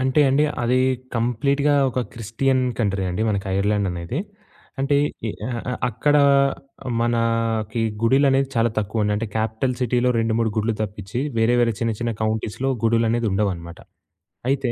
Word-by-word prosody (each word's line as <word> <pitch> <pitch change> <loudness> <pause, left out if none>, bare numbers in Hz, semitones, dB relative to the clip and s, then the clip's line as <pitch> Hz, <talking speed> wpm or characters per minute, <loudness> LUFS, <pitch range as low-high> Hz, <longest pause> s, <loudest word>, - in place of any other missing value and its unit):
అంటే 130 +3 +2
అండి 140 +3 +3 0.2
అది 125 +2 +2 0.4
కంప్లీట్‌గా 140 +5 +1 0.2
ఒక 130 - -1
క్రిస్టియన్ 130 +4 0 0.2
కంట్రీ 100 -4 0
అండి 90 +5 -2
మనకి 100 -2 -1
ఐర్‌లాండ్ 100 0 +1
అనేది. 85 - -4 0.6
అంటే 140 +1 +2 0.3
ఇ - - -1 0.2
అ - - -3 0.4
అక్కడ 125 +6 +2 0.8
మనకి 115 -1 0 0.2
గుడిలనేది 135 +2 +3
చాలా 115 -1 +2
తక్కువండి 105 0 0
అంటే 115 +2 -2
క్యాపిటల్ 110 +3 -1
సిటీ‌లో 125 0 +2
రెండు, 115 0 +1
మూడు 115 -1 +1
గుడులు 110 +1 +1
తప్పించి 105 +2 -5 0.2
వేరే 115 +2 +3
వేరే 115 -1 +3
చిన్న 115 -1 +1
చిన్న 115 0 -1
కౌంటీస్‌లో 110 +4 -1 0.2
గుడులనేది 115 0 +2
ఉండవన్నమాట. 90 -4 -2 0.7
అయితే 135 -3 +1
115 Hz, 140 wpm, -22 LUFS, 110-125 Hz, 0.8 s, అండి